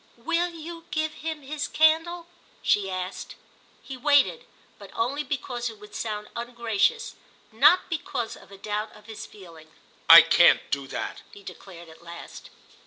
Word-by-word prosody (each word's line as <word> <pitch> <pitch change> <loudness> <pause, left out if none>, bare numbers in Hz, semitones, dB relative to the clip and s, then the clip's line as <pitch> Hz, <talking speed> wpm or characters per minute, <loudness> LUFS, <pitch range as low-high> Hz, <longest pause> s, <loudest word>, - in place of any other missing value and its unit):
"Will 335 +8 -1
you 335 0 -10
give 310 0 -2
him 315 -1 -6
his 290 +1 -4
candle?" 325 +2 +2 0.4
she 195 -2 +2
asked. 185 0 -6 0.5
He 270 - -8
waited, 265 - +2 0.3
but 200 -2 -12
only 270 +6 -1
because 250 -4 -4
it 220 - -12
would 210 0 -14
sound 210 -2 -4
ungracious; 235 - -1 0.4
not 300 +11 +5
because 295 -8 -4
of - - -17
a 195 - -12
doubt 210 +2 -4
of 210 - -17
his 220 -1 -9
feeling. 165 -6 -15 0.4
"I - - +12
can't - - +4
do 140 -1 -2
that!" - - -5
he 200 - -14
declared 175 -3 -12
at 160 0 -16
last. 170 0 -11
235 Hz, 155 wpm, -25 LUFS, 200-310 Hz, 0.5 s, I